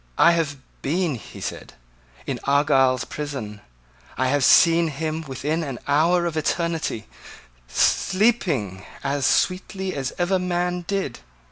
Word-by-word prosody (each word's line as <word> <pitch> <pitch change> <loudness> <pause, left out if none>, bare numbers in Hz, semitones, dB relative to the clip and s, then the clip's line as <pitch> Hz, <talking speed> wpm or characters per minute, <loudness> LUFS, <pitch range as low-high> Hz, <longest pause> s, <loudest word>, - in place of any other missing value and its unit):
"I 170 - +7
have 160 -4 0 0.2
been," 165 +2 0
he 120 - -9
said, - - -6 0.5
"in - - -3
Argyle's 135 -2 +3
prison. 130 -9 -6 0.6
I 130 0 +1
have 145 0 +1
seen 165 +4 +6
him 155 +2 -3
within 145 +5 -2
an 135 -5 -5
hour 165 +5 +3
of 170 -2 -2
eternity, 160 -7 -1 0.6
sleeping 160 - +1 0.2
as 140 -1 0
sweetly 185 +1 0
as 135 -2 -3
ever 185 +2 +1
man 180 -1 -1
did. 195 -11 -2
155 Hz, 125 wpm, -23 LUFS, 135-175 Hz, 0.6 s, I